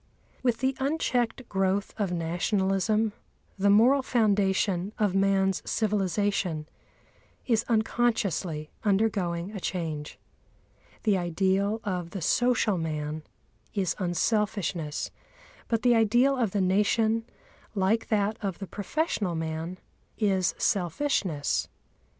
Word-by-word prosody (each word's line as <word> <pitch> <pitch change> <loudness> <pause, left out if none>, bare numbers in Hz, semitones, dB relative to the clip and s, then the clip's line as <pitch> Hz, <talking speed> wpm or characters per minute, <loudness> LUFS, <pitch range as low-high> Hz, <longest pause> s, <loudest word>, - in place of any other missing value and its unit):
With 245 -2 0
the 265 0 +1
unchecked 260 -4 0
growth 195 +1 0
of 200 -4 -1
Nationalism 195 +5 0 0.5
the 200 +1 +3
moral 240 +7 +6
foundation 200 -5 +1
of 205 -4 +1
man's 195 -1 +2
civilisation 200 -6 0 0.8
is 225 -3 +2
unconsciously 215 -9 0
undergoing 195 -4 +1
a 210 - -6
change. 160 -5 -4 0.9
The 205 -4 +3
ideal 190 +5 0
of 180 -4 -3
the 190 +1 -6
social 240 -5 +2
man 155 -1 -3 0.5
is 185 -5 0
unselfishness, 180 -4 -1 0.6
but 230 0 0
the 245 -1 +5
ideal 240 +5 +4
of 240 -5 +1
the 200 +1 0
Nation, 215 +4 +2 0.5
like 200 +3 +1
that 210 0 0
of 195 -4 -2
the 195 - -6
professional 205 - -2
man, 160 +2 -4 0.4
is 190 -4 +1
selfishness. 180 - 0
200 Hz, 105 wpm, -27 LUFS, 180-220 Hz, 0.9 s, moral